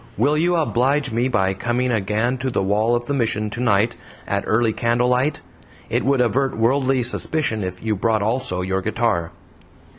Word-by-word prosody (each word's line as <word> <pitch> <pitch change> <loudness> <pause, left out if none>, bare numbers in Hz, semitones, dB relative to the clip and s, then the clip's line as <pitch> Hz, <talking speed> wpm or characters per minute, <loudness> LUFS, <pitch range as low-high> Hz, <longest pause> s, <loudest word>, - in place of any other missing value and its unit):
Will 140 +8 +2
you 175 +3 +2
oblige 140 -2 +1
me 120 +3 +1
by 95 -6 +1
coming 120 +5 -1
again 110 +4 0
to 130 +1 -2
the 95 - -1
wall 105 +4 +2
of 120 0 -2
the 140 - -2
Mission 110 -5 -1
tonight 115 -1 +1 0.3
at 100 0 -1
early 110 0 +2
candlelight? 125 +5 +1 0.5
It - - +1
would 135 0 +2
avert 130 +2 0
worldly 130 +2 +2
suspicion 120 -2 -1
if 90 +1 -6
you 110 -1 0
brought 110 +1 0
also 110 -5 -1
your 95 +1 -1
guitar." 105 -5 -1
120 Hz, 170 wpm, -21 LUFS, 105-130 Hz, 0.5 s, Will